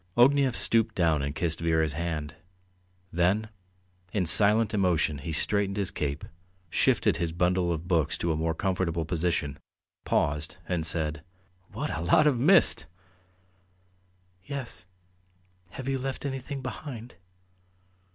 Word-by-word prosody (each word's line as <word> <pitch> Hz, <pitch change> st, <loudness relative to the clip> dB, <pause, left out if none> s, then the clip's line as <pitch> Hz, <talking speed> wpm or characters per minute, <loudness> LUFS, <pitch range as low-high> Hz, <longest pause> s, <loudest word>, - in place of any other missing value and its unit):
Ognev 135 Hz, 0 st, +4 dB
stooped 115 Hz, -1 st, +1 dB
down 80 Hz, -4 st, +2 dB
and 70 Hz, +1 st, -3 dB
kissed 80 Hz, 0 st, -1 dB
Vera's 80 Hz, -2 st, +1 dB
hand. 80 Hz, -1 st, -3 dB, 0.8 s
Then, 95 Hz, +6 st, +1 dB, 0.6 s
in 95 Hz, -4 st, 0 dB
silent 105 Hz, +5 st, +5 dB
emotion, 85 Hz, -7 st, +1 dB
he 80 Hz, +4 st, -5 dB
straightened 100 Hz, +4 st, +1 dB
his 100 Hz, -3 st, 0 dB
cape, 75 Hz, 0 st, -3 dB, 0.5 s
shifted -, -, +2 dB
his 85 Hz, -1 st, -2 dB
bundle 90 Hz, +1 st, +1 dB
of 85 Hz, +1 st, -4 dB
books 80 Hz, -4 st, +1 dB
to 85 Hz, -, -1 dB
a -, -, 0 dB
more 80 Hz, +1 st, -1 dB
comfortable 85 Hz, -3 st, -1 dB
position, 85 Hz, -4 st, -1 dB, 0.4 s
paused, 75 Hz, +4 st, -1 dB
and 85 Hz, -3 st, -1 dB
said: 80 Hz, -2 st, -1 dB, 0.5 s
"What -, -, -3 dB
a 75 Hz, -, -4 dB
lot 85 Hz, -, +4 dB
of 140 Hz, -5 st, +3 dB
mist!" 175 Hz, +9 st, +4 dB, 1.6 s
"Yes. 135 Hz, -7 st, -6 dB, 0.8 s
Have 130 Hz, +7 st, -8 dB
you 135 Hz, -1 st, 0 dB
left 135 Hz, +2 st, -4 dB
anything 135 Hz, 0 st, -5 dB
behind?" 125 Hz, -1 st, -7 dB
90 Hz, 130 wpm, -27 LUFS, 80-115 Hz, 1.6 s, silent